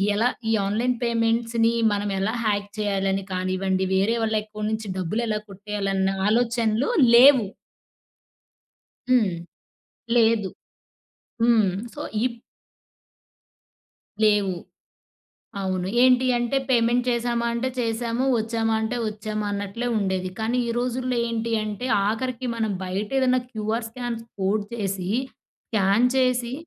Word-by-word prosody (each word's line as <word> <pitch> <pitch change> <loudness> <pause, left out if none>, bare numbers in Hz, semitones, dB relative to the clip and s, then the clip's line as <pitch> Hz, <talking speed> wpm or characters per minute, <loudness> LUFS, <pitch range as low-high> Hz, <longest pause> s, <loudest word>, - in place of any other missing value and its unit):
ఎలా 235 +4 +3 0.2
ఈ - - +3
ఆన్లైన్ 235 +5 0
పేమెంట్స్‌ని 230 0 +1 0.2
మనం 205 0 -2
ఎలా 205 +3 0
హ్యాక్ 205 -1 0
చేయాలని 195 -1 0
కానివ్వండి, 185 +1 -1
వేరే 205 +5 +2
వాళ్ళ 220 0 0
అకౌంట్ 215 0 -4
నుంచి 220 -2 -4
డబ్బులు 190 +6 -1
ఎలా 210 -1 -1
కొట్టేయాలన్న, 195 -1 -2 0.2
ఆలోచనలు 230 +1 +1 0.3
లేవు. 255 -3 +7 1.6
హ్మ్. 235 -7 +3 0.8
లేదు. 225 -4 +3 0.9
హ్మ్. 225 -5 +4 0.2
సో, - - -8 0.3
ఇప్ 235 -2 -5 1.9
లేవు. 205 -3 +3 1.1
అవును. 185 -1 -2 0.2
ఏంటి 255 0 +5
అంటే, 240 +3 0
పేమెంట్ 240 0 +3
చేసామా 235 0 0
అంటే 240 +2 -1
చేశాము, 230 +1 -1 0.2
వచ్చామా 225 0 -1
అంటే 230 +3 -2
వచ్చామా 215 0 -4
అన్నట్లే 200 +4 -3
ఉండేది. 190 -2 -1
కానీ, 225 +3 0
ఈ - - -2
రోజుల్లో 250 0 -1
ఏంటి 230 0 -2
అంటే, 215 +3 -4 0.2
ఆఖరికి 250 +3 -2
మనం 220 -2 -1
బయట 190 +3 -3
ఏదన్నా 255 -1 +3
క్యూఆర్ 220 +1 -2
స్కామ్స్ 235 -1 -5 0.2
కోడ్ 200 +2 +1
చేసి, 195 -4 -3 0.6
స్క్యాన్ 210 +3 +3
చేసి 250 -2 +1
220 Hz, 115 wpm, -24 LUFS, 200-235 Hz, 1.9 s, లేవు